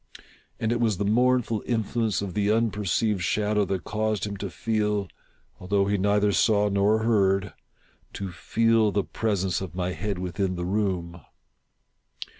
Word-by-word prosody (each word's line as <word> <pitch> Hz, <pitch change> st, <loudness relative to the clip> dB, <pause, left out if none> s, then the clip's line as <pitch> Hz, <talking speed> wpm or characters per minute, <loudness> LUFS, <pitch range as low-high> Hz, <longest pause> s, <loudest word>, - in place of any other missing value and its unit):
And 110 Hz, -, 0 dB
it 120 Hz, -, 0 dB
was 110 Hz, -5 st, +1 dB
the 100 Hz, -, -1 dB
mournful 120 Hz, 0 st, +2 dB
influence 110 Hz, -2 st, 0 dB
of 95 Hz, -3 st, -5 dB
the 105 Hz, -1 st, 0 dB
unperceived 105 Hz, -2 st, 0 dB
shadow 105 Hz, +3 st, +1 dB
that 95 Hz, -1 st, -3 dB
caused 110 Hz, -3 st, -1 dB
him 100 Hz, -1 st, -5 dB
to 100 Hz, 0 st, -5 dB
feel 105 Hz, 0 st, -1 dB, 0.3 s
— -, -, -38 dB
although 100 Hz, +2 st, +1 dB
he 100 Hz, +1 st, +1 dB
neither 100 Hz, +1 st, +2 dB
saw 105 Hz, 0 st, +3 dB
nor 100 Hz, +3 st, +2 dB
heard 100 Hz, -3 st, +2 dB, 0.3 s
— -, -, -36 dB
to 100 Hz, -1 st, -5 dB
feci 115 Hz, +5 st, +2 dB
the 100 Hz, -, +2 dB
presence 95 Hz, -5 st, -1 dB
of 90 Hz, -3 st, -7 dB
my 90 Hz, 0 st, -1 dB
head 100 Hz, +4 st, -3 dB
within 90 Hz, +1 st, -2 dB
the 90 Hz, 0 st, -3 dB
room. 90 Hz, -4 st, -2 dB
105 Hz, 160 wpm, -26 LUFS, 95-110 Hz, 0.3 s, saw